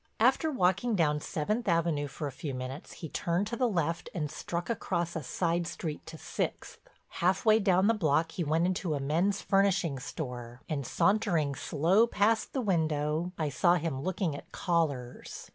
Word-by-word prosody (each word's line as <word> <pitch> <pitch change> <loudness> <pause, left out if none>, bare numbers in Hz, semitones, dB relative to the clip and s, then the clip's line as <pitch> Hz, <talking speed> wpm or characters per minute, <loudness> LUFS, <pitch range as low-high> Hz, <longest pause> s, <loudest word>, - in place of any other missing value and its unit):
After 320 - +4
walking 200 - +2
down 150 -4 +2
Seventh 210 +11 -2
Avenue 165 -4 +1
for 150 +2 -6
a 140 - -3
few 135 +1 -5
minutes 130 +4 -6
he 165 - -7
turned 170 +5 -1
to 230 +3 -3
the 250 0 +1
left 170 -4 -1
and 150 -4 -2
struck 170 +2 -4
across 175 -7 -2
a 160 - -2
side 170 +4 -1
street 155 -3 -5
to 160 - -8
Sixth. - - -4 0.4
Half 185 +4 +2
way 220 0 +6
down 190 -2 +3
the 225 - +5
block 165 -5 +1
he 175 - -2
went 160 +3 +2
into 180 -3 0
a - - -2
men's 170 +9 +1
furnishing 195 -7 +2
store, 125 -3 -6
and 140 -5 -3
sauntering 175 -8 +2
slow 175 +12 +2
past 220 0 +1
the 265 - 0
window, 160 -4 0
I 155 -2 0
saw 175 +6 +3
him 160 -6 -2
looking 185 -2 -1
at - - -10
collars. 145 -8 -2
170 Hz, 180 wpm, -30 LUFS, 150-190 Hz, 0.4 s, way